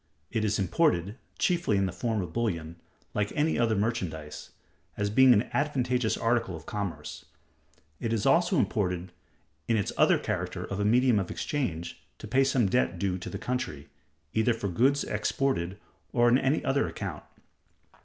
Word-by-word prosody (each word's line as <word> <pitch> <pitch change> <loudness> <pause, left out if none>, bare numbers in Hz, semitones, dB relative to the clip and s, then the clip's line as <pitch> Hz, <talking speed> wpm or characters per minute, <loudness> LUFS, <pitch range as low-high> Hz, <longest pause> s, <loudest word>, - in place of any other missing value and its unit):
It 110 - 0
is 105 -1 +1
imported 100 - +1 0.2
(chiefly 170 - +1
in 95 - +2
the 95 - -2
form 105 +3 -1
of 85 -2 -8
bullion) 85 -8 -2 0.4
like 105 0 -1
any 155 -1 +1
other 115 -2 +2
merchandise, 90 -9 -3 0.5
as 105 0 -1
being 130 +3 +7
an 110 -1 +4
advantageous 125 -5 0
article 115 -5 0
of 80 0 -10
commerce. 100 -4 -5 0.7
It 115 - -2
is 115 -2 0
also 175 +2 +4
imported 90 -8 0 0.6
in 115 - +2
its 100 - -1
other - - +5
character - - -3
of 100 - -5
a 100 - +1
medium 120 0 +4
of 95 - -3
exchange, 90 - -3 0.2
to - - -9
pay 135 +1 +3
some 135 -4 +2
debt 95 -4 +1
due 95 0 -1
to - - -6
the - - -5
country, 125 - -4 0.4
either 110 +1 +2
for 105 -3 -3
goods 135 +10 +2
exported 100 -9 -1 0.4
or 120 -1 +4
on 125 +2 +5
any 135 +3 +1
other 140 +1 +2
account. - - -5
110 Hz, 165 wpm, -28 LUFS, 95-125 Hz, 0.7 s, being